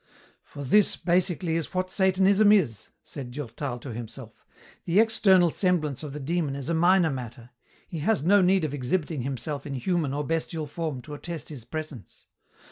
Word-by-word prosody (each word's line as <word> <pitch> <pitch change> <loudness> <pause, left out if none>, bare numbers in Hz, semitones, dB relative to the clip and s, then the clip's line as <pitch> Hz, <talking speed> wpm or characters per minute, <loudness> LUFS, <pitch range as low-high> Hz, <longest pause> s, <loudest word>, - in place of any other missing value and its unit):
"For 145 - -9
this, 205 +10 +4
basically, 175 -2 +1
is 165 +3 -5
what 185 0 -1
Satanism 195 +2 +4
is," 145 - +2
said 130 -3 -7
Durtal 125 0 -5
to 120 0 -8
himself. 115 0 -9 0.4
"The 175 +4 +3
external 190 -6 +4
semblance 160 -8 0
of 150 -2 -6
the 150 - -6
Demon 150 0 -1
is 140 +1 -4
a - - +1
minor 175 0 +4
matter. 120 -2 -7 0.4
He 165 - -6
has 195 +1 +1
no 200 +4 +5
need 185 -2 +3
of 145 - -4
exhibiting 145 +2 -2
himself 140 +3 -4
in 140 - -4
human 160 +1 -1
or 145 +1 -2
bestial 160 +1 -2
form 150 -4 -5
to 150 - -9
attest 165 +1 -7
his 135 -7 -9
presence. 155 -4 -8
155 Hz, 175 wpm, -26 LUFS, 135-180 Hz, 0.4 s, no